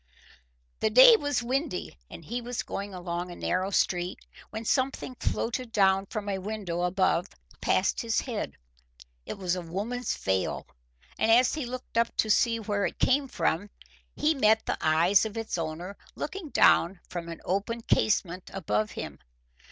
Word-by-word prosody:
The 220 - +2
day 255 - +9
was 290 - -1
windy 265 - -2
and 165 - -11
he 240 +6 -3
was 245 0 -4
going 200 +1 -5
along 175 -1 -4
a 175 - -8
narrow 185 +2 -1
street, 180 -2 0 0.3
when 220 +1 -6
something 260 +1 0
floated 240 +1 -2
down 195 -2 +3
from 210 0 -5
a 195 -1 -1
window 190 -4 -4
above 180 0 +1 0.3
past - - +1
his 230 -2 0
head. 230 - -4 0.7
It - - -5
was 185 -2 -1
a 180 - -4
woman's 210 +8 -3
veil, 95 -1 -1 0.5
and 220 - +2
as 245 +2 +5
he 300 -5 -3
looked 250 -2 -3
up 230 - 0
to 215 - +2
see 230 +1 +3
where 205 -2 0
it - - -8
came 275 +2 +2
from 205 -5 -1 0.5
he 310 +1 +2
met 220 -5 +3
the - - -2
eyes 165 +5 +4
of 220 0 -4
its 225 -1 -3
owner 170 +3 -4 0.2
looking 335 +1 -5
down 180 -7 +4
from 170 -1 -6
an 165 - -7
open 205 +5 -1
casement 185 -5 0
above 105 - 0
him. - - -6
205 Hz, 165 wpm, -28 LUFS, 180-240 Hz, 0.7 s, day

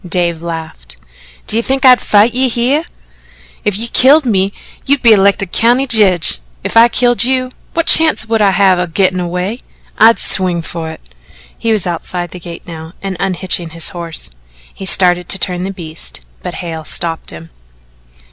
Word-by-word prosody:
Dave 170 -2 -1
laughed: 160 - -8 0.5
"D'ye 225 - +1
think 270 +3 -1
I'd 250 -1 +6
fight 210 +3 +3
you 260 +1 +1
hyeh? 255 +7 0 0.8
If 205 -2 -1
you 230 +2 -3
killed 275 +5 +4
me, 195 -4 0 0.4
you'd 280 -1 +2
be 230 -2 +7
elected 200 -2 +2
County 245 +4 +2
Jedge; 195 - +3 0.2
if - - -5
I 230 +1 +7
killed 245 -2 +2
you, 255 0 +1 0.2
what 335 0 0
chance 320 -8 +4
would 225 -1 -1
I 205 - +4
have 190 -1 +2
o' 180 - -1
gittin' 185 +2 0
away? 180 +6 -4 0.4
I'd 230 +1 +6
swing 180 -3 0
fer 165 -1 -6
it." 160 - -11 0.5
He 230 - -2
was 215 -4 +1
outside 175 0 -5
the 180 - -9
gate 170 0 -10
now 160 0 -10
and 195 -1 -4
unhitching 180 -3 -1
his 165 -1 0
horse. 165 - -5 0.4
He 195 - -6
started 180 -2 +2
to - - +6
turn 180 -1 -2
the 195 - -4
beasts 160 - -7 0.2
but - - -6
Hale 160 -2 -6
stopped 165 +1 -2
him. 80 -2 -8
190 Hz, 175 wpm, -13 LUFS, 170-230 Hz, 0.8 s, be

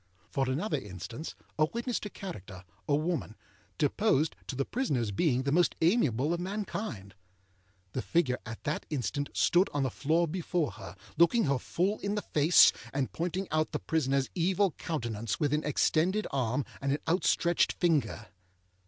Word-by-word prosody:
For 135 -1 0
another 150 +4 -1
instance: 110 - -7 0.2
a 155 - +6
witness 235 +1 -2
to 210 - -6
character, 100 - -8 0.2
a 145 - +3
woman, 155 -7 -2 0.4
deposed 150 +4 +2
to 135 - -4
the 135 +1 0
prisonerâs 125 - -1
being 130 - +2
the 140 - 0
most 175 +3 +3
amiable 155 - +2
of 170 - -2
mankind. 185 - -4 0.8
The 130 - -2
figure 145 -7 +1
at 115 +1 -8
that 150 - -2
instant 145 0 -2
stood 180 +2 +4
on 145 - +1
the 130 - 0
floor 160 +7 +1
before 175 - -1
her, 95 -2 -10 0.2
looking 220 +7 +5
her 140 -3 +1
full 190 - -1
in 200 +1 -2
the 210 - -2
face, 155 +3 +6 0.2
and 135 -1 -2
pointing 180 +3 -2
out 155 0 0
the - - -1
prisonerâs 140 -4 0
evil 185 +2 +2
countenance 115 - -3
with 145 -1 +1
an 150 - +1
extended 170 +7 +2
arm 130 0 0 0.2
and 140 0 0
an 145 - 0
outstretched 170 0 +2
finger. 155 - 0
155 Hz, 160 wpm, -30 LUFS, 130-175 Hz, 0.8 s, a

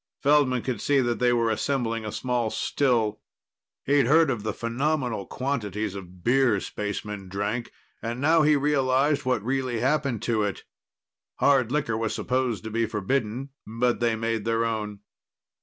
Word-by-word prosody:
Feldman 140 -4 +3
could 120 -6 -3
see 145 -1 +3
that 120 -2 0
they 125 0 +3
were 115 -2 +2
assembling 115 -2 -1
a - - -4
small 125 -2 -1
still. 115 -5 0 0.7
He'd 140 -3 +3
heard 160 +1 +5
of 120 -5 -3
the 110 +1 -2
phenomenal 120 -2 -1
quantities 110 -7 -2
of 90 -2 -10
beer 125 -4 +3
spacemen 105 -1 -5
drank, 105 +5 -3 0.3
and 120 +1 -4
now 160 +4 +4
he 150 0 +5
realized 140 0 +2
what 125 -5 0
really 130 -2 -1
happened 135 -2 0
to 115 -2 +1
it. 105 -2 -2 0.7
Hard 130 -4 +3
liquor 140 -6 0
was 110 0 -1
supposed 125 -4 -1
to 110 - -6
be 115 +1 0
forbidden, 115 +4 -2 0.2
but 120 +2 0
they 120 -1 +2
made 115 -1 -2
their 115 +1 +1
own. 105 -3 -3
120 Hz, 155 wpm, -26 LUFS, 110-135 Hz, 0.7 s, heard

